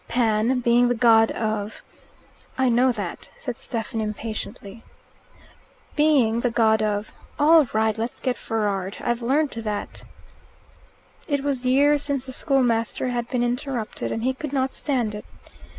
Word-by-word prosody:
Pan, 230 +1 +1
being 240 +1 +4
the 245 - +1
god 225 -1 +5
of 215 -1 -3 0.4
" - - -30 0.3
"I 260 -1 +3
know 250 +2 +4
that," 205 -7 -6
said 245 -3 -6
Stephen 225 -1 -4
impatiently. 215 0 -6 0.6
" - - -29
Being 275 -7 +3
the 245 - +1
god 220 -2 +3
of 210 0 -1
" - - -28
"All 310 -1 +6
right. 220 0 +1
Let's 225 +2 -4
get 255 -2 -1
furrard. 205 -5 -2
I've 240 0 -1
learnt 275 +5 +1
that." 210 -2 -4 1.2
It 285 -2 -1
was 265 -3 -1
years 285 +3 +4
since 280 -3 -1
the 260 - -7
schoolmaster 250 -3 0
had 240 -1 -3
been 250 -2 0
interrupted, 245 -2 -3
and 225 - -3
he 260 +1 +1
could 285 +1 -6
not 265 -1 0
stand 245 -7 -1
it. 210 - -7
240 Hz, 155 wpm, -23 LUFS, 220-260 Hz, 1.2 s, All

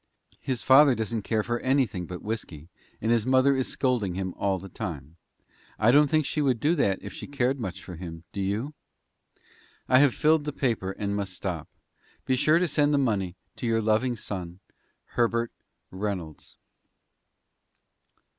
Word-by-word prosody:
His 130 -3 -3
father 135 0 +7
doesn't 110 0 -2
care 110 +1 0
for 120 +1 -2
anything 130 -9 0
but 90 -1 -7
whisky, 90 -8 -5 0.3
and 110 - +1
his 115 -2 +3
mother 130 +1 +4
is 130 -1 0
scolding 120 -9 0
him 95 -1 -3
all 100 -1 0
the 95 +2 -9
time. 85 - -6 0.6
I 110 +2 +4
don't 145 +2 +6
think 155 -1 +2
she 150 - -1
would 130 -5 +2
do 150 +8 +2
that 100 - +2
if 100 - -7
she - - -8
cared 135 -1 0
much 95 -4 -5
for 90 -3 -9
him, 85 -2 -8
do 100 - -4
you? 105 +10 -2 1.1
"I 130 - +6
have 140 -2 +4
filled 155 0 +3
the 150 - -3
paper, 115 -9 -1
and 100 0 -3
must 100 -2 -3
stop. 90 -4 -4 0.6
Be 130 - +2
sure 155 +5 +4
to 180 +1 +2
send 150 -2 +2
the - - +3
money 100 -9 0 0.2
to 120 - -3
your 115 0 +2
loving 110 +3 +1
son, 90 -5 -6 0.5
"HERBERT 115 0 +1 0.4
REYNOLDS." 95 -5 -5
115 Hz, 170 wpm, -27 LUFS, 95-130 Hz, 1.1 s, father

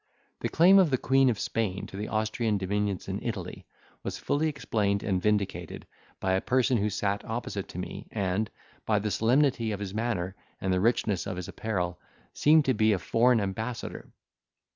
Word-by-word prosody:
The - - -2
claim 185 +4 +6
of 185 -4 +5
the 130 - +2
Queen 135 +1 +3
Of 115 - 0
Spain 100 -4 -2
to - - -10
the 105 +2 -4
Austrian 110 0 0
dominions 100 0 -1
in - - -3
Italy - - -5 0.3
was - - -4
fully 155 +2 0
explained 105 -8 -1
and 95 -3 0
vindicated, 100 -5 -1 0.3
by 95 -1 0
a 95 - +2
person 130 -1 +2
who 105 +1 +1
sat 100 0 -1
opposite - - -4
to - - -10
me, - - -6
and, 100 0 -1 0.4
by 110 - +3
the 105 +1 -1
solemnity 120 0 +2
of 100 - -3
his 100 -2 -5
manner 105 -5 -2 0.2
and 95 -1 0
the 90 - +1
richness 105 -4 +1
of 95 - -3
his 90 - -5
apparel, 90 -5 -3 0.3
seemed 155 0 +5
to 130 - +3
be 110 -1 +3
a - - +1
foreign 115 +7 +3
ambassador. 110 +4 -4
105 Hz, 185 wpm, -28 LUFS, 100-120 Hz, 0.4 s, claim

